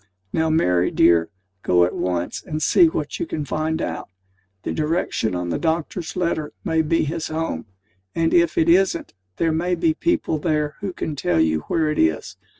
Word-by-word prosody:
Now, 160 0 +1
Mary, 90 - +2
dear, 85 0 +4 0.3
go 90 -2 +3
at 90 - -3
once, 90 -1 -2
and 155 - -4
see 340 - +5
what 335 +2 -3
you 340 - -2
can 150 - -3
find 155 +2 -1
out. - - -4 0.5
The - - -2
direction 155 - -1
on 90 0 -3
the - - -1
doctor's 165 +1 -2
letter 170 -4 -1
may 160 -4 +1
be 165 +1 +1
his 160 +1 -3
home; 160 - -3 0.5
and 165 0 +1
if 170 -1 +3
it 160 - +3
isn't, 180 0 +2 0.2
there 165 -1 +1
may 175 +3 0
be 320 - +2
people 320 - 0
there 150 -2 0
who 200 -1 -3
can 155 -4 -4
tell 90 - 0
you 80 -1 +2
where 155 -2 +1
it 150 - -2
is. 80 -1 +1
160 Hz, 185 wpm, -22 LUFS, 105-170 Hz, 0.5 s, see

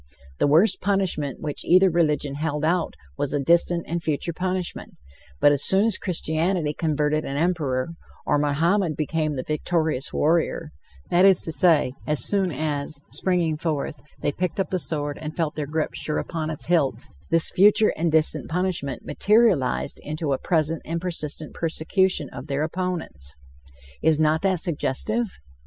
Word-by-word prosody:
The - - +3
worst 170 +8 +4
punishment 180 -8 -1
which 150 -2 -4
either 185 +1 +5
religion 150 -4 +1
held 150 +1 -2
out 175 +1 0 0.2
was 145 +1 -1
a - - +1
distant 170 +3 +3
and 170 - -2
a - - -4
future 160 +1 -2
punishment; 185 +1 -3 0.5
but 145 - +6
as 145 -1 +1
soon 195 +2 +4
as 225 -4 +1
Christianity 165 -2 -1
converted 155 -1 0
an 140 - -4
Emperor, 150 -6 0 0.4
or 145 - +2
Mohammed 160 +4 +1
became 155 0 -1
the 130 - -3
victorious 155 -2 -1
warrior, 165 0 0 0.4
that 175 +1 +4
is 195 -2 +6
to 160 - -3
say, 160 -6 +3
as 150 -6 -1
soon 195 -3 +1
as, 145 0 -3
springing 175 -4 0
forth, 155 -2 -3 0.2
they - - +1
picked 180 +4 -3
up 190 - -1
the 185 - 0
sword 145 -3 -3
and 155 0 -7
felt 160 -3 0
their 150 -2 -4
grip 155 +1 -1
sure 150 - -3
upon 160 -3 -3
its 155 - -4
hilt, 145 -9 +1 0.3
this 165 0 +3
future 210 +3 +5
and 165 +1 0
distant 155 0 +2
punishment 170 -6 -2
materialized 205 - +2
into 155 -1 -2
a 135 - -1
present 160 -1 0
and 165 +1 -3
persistent 160 -4 -4
persecution 165 0 0
of 140 - -8
their 140 0 -1
opponents. 165 - -4 0.7
Is 155 -1 +3
not 155 +1 +2
that 190 -3 +1
suggestive? 195 - -2
160 Hz, 165 wpm, -24 LUFS, 150-180 Hz, 0.7 s, but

